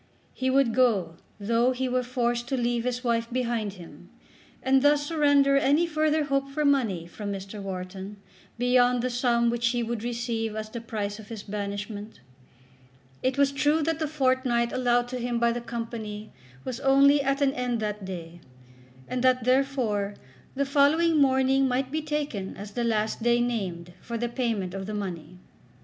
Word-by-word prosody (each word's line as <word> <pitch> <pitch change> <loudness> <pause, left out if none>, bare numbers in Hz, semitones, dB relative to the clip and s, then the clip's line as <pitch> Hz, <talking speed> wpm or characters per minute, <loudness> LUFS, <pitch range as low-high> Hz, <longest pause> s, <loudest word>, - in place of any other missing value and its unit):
He 260 0 -1
would 260 -3 +3
go 205 -10 +2 0.2
though 235 +5 +2
he 260 +1 -2
were 255 0 +1
forced 240 -1 -1
to 265 - -1
leave 240 -1 0
his 250 0 -2
wife 230 -1 0
behind 235 -5 -1
him, 175 -4 -13 0.5
and 265 0 +4
thus 290 +1 +3
surrender 285 -3 +3
any 285 +5 +3
further 310 -1 +1
hope 275 -1 -1
for 300 +2 -1
money 230 -12 +1
from 200 +4 -6
Mr. 195 +1 -6
Wharton 190 +1 -6 0.4
beyond 245 0 +3
the 255 - -1
sum 235 -1 +2
which 235 0 0
he 240 0 0
would 230 -1 -3
receive 230 -2 -2
as 215 0 -5
the 235 - -5
price 210 -2 -4
of 215 - -11
his 220 -2 -7
banishment. 205 +1 -5 1.0
It 260 +1 0
was 280 -1 +4
true 295 +3 +2
that 325 +1 -1
the 310 - 0
fortnight 255 -5 +1
allowed 245 -1 +2
to 250 0 -4
him 240 0 -1
by 235 0 +3
the 240 +1 -3
Company 225 -3 -6 0.3
was 255 -1 -4
only 275 +1 +5
at 275 0 0
an 275 -1 +2
end 250 -2 -1
that 210 -1 -3
day, 175 -2 -7 0.7
and 255 0 -2
that, 255 -1 +3
therefore, 250 -6 +1 0.4
the 280 +1 0
following 300 +3 +3
morning 265 0 +3
might 260 +1 -1
be 310 +1 -1
taken 295 -10 -3
as 205 +1 -8
the 240 +3 -2
last 220 -1 0
day 240 +1 +3
named 185 -8 -2
for 235 - -5
the 240 +1 -2
payment 225 -7 -2
of 195 0 -5
the 215 - -4
money. 180 -4 -5
240 Hz, 175 wpm, -26 LUFS, 215-270 Hz, 1.0 s, only